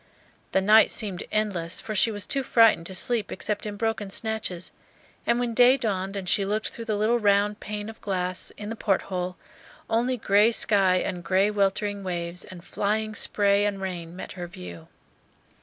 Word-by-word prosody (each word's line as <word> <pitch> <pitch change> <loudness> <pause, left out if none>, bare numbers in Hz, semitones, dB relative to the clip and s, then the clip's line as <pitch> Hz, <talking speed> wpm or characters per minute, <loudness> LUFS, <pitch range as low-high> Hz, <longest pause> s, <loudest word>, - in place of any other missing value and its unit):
The 190 - +2
night 215 +3 +6
seemed 195 -5 -1
endless, 190 -6 -1
for 215 - -6
she 215 +2 +3
was 205 -3 -3
too 275 - 0
frightened 225 -9 +4
to 190 - -4
sleep 230 +3 +1
except 210 0 -3
in 205 - -5
broken 225 -1 -2
snatches; 195 -4 -2 0.6
and 235 0 +2
when 240 -1 -1
day 250 +3 +6
dawned, 195 -5 -2
and 195 -2 -5
she 200 - +2
looked 210 +2 -2
through 230 - -9
the 215 -2 -1
little 225 +3 +2
round 205 0 +2
pane 210 0 -5
of 225 0 -10
glass 185 -2 -3
in 210 0 -6
the 225 - -4
port 200 -3 0
hole, 180 -1 -4 0.5
only 245 +3 +1
gray 210 +1 +4
sky 195 -5 +3
and 180 -1 -2
gray 195 +4 +2
weltering 200 0 0
waves 175 -1 -4
and 175 -2 -12
flying 215 +1 -1
spray 200 -1 +2
and 205 -1 -1
rain 175 -3 -5
met 185 - -8
her 175 -2 -6
view. 85 - -10
205 Hz, 185 wpm, -25 LUFS, 185-220 Hz, 0.6 s, night